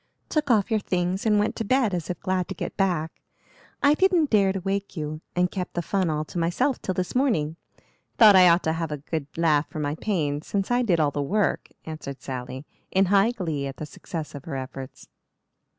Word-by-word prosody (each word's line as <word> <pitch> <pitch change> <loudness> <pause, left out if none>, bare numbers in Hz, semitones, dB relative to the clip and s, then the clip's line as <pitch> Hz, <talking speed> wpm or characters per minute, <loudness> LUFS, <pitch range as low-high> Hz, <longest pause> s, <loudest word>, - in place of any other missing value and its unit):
"Took 300 -2 0
off 215 -3 +3
your 220 - +3
things 185 +1 -1
and 210 -1 +4
went 210 +1 +1
to - - -1
bed 240 -2 +2
as 170 -3 -3
if 180 - -3
glad 185 -2 -1
to 195 - -6
get - - -5
back. 175 -5 -1 0.6
I 285 +1 +6
didn't 350 -3 +3
dare 200 -3 +4
to 195 - -3
wake 195 +1 -3
you, 155 0 -4
and 180 0 +2
kept 180 -3 -5
the 175 - -1
fun 190 0 0
all 155 0 -1
to 155 +4 -5
myself 230 +11 0
till 185 - -2
this 180 -1 -2
morning. 175 - +1 0.6
Thought 215 -3 +8
I 180 -1 +8
ought 170 +2 +4
to 160 - +1
have 165 -1 -3
a 150 - -2
good 145 0 -4
laugh 155 -3 +2
for - - -8
my 145 -1 -1
pains 155 -5 -2
since 200 +2 -1
I 245 +1 +3
did 185 -9 +2
all 150 -2 +2
the 145 - -2
work," 200 +8 0 0.2
answered 155 -4 -7
Sally, 130 +1 -6 0.2
in 190 +1 +3
high 200 +3 +5
glee 165 - -3
at 135 - -7
the 155 - -5
success 155 +1 -7
of 145 -1 -9
her 160 - -5
efforts. 130 0 -7
180 Hz, 220 wpm, -25 LUFS, 155-200 Hz, 0.6 s, Thought